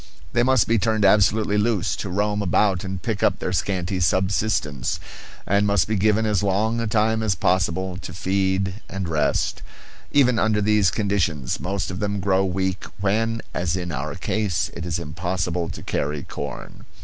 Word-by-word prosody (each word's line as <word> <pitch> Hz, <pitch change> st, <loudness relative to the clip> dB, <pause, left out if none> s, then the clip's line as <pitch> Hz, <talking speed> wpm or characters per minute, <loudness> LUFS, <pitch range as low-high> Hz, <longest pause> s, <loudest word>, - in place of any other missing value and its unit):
They 120 Hz, -, +3 dB
must 130 Hz, -2 st, +4 dB
be 115 Hz, 0 st, +3 dB
turned 110 Hz, +1 st, +1 dB
absolutely 105 Hz, +1 st, +4 dB
loose 105 Hz, -4 st, +1 dB
to 100 Hz, -, -4 dB
roam 105 Hz, +2 st, 0 dB
about 95 Hz, -1 st, +2 dB
and 95 Hz, -1 st, -4 dB
pick 105 Hz, +3 st, -3 dB
up 100 Hz, -, +3 dB
their 90 Hz, -, -3 dB
scanty 90 Hz, +1 st, -1 dB
subsistence, 90 Hz, -, 0 dB, 0.5 s
and 100 Hz, +1 st, +2 dB
must 100 Hz, -3 st, +2 dB
be 110 Hz, -, 0 dB
given 110 Hz, +2 st, +2 dB
as 105 Hz, -3 st, +1 dB
long 105 Hz, +4 st, +1 dB
a 115 Hz, -, -1 dB
time 110 Hz, 0 st, +2 dB
as 105 Hz, -4 st, +1 dB
possible 95 Hz, -1 st, 0 dB
to -, -, -7 dB
feed 95 Hz, +2 st, -1 dB
and 95 Hz, -2 st, -4 dB
rest; 80 Hz, -2 st, 0 dB, 0.5 s
even 125 Hz, -5 st, +4 dB
under 110 Hz, -1 st, +2 dB
these 105 Hz, -2 st, +3 dB
conditions 90 Hz, -, -1 dB
most 95 Hz, +3 st, -2 dB
of 90 Hz, -, -5 dB
them 100 Hz, -1 st, -1 dB
grow 95 Hz, 0 st, +2 dB
weak 95 Hz, 0 st, -1 dB
when, 110 Hz, +3 st, 0 dB
as 90 Hz, -1 st, -1 dB
in 90 Hz, -2 st, -3 dB
our 70 Hz, +1 st, -4 dB
case, 100 Hz, -1 st, -1 dB
it 85 Hz, 0 st, -5 dB
is 85 Hz, -, -1 dB
impossible 85 Hz, +1 st, -2 dB
to -, -, -8 dB
carry 75 Hz, 0 st, -2 dB
corn. 70 Hz, -2 st, -7 dB
95 Hz, 175 wpm, -23 LUFS, 90-105 Hz, 0.5 s, must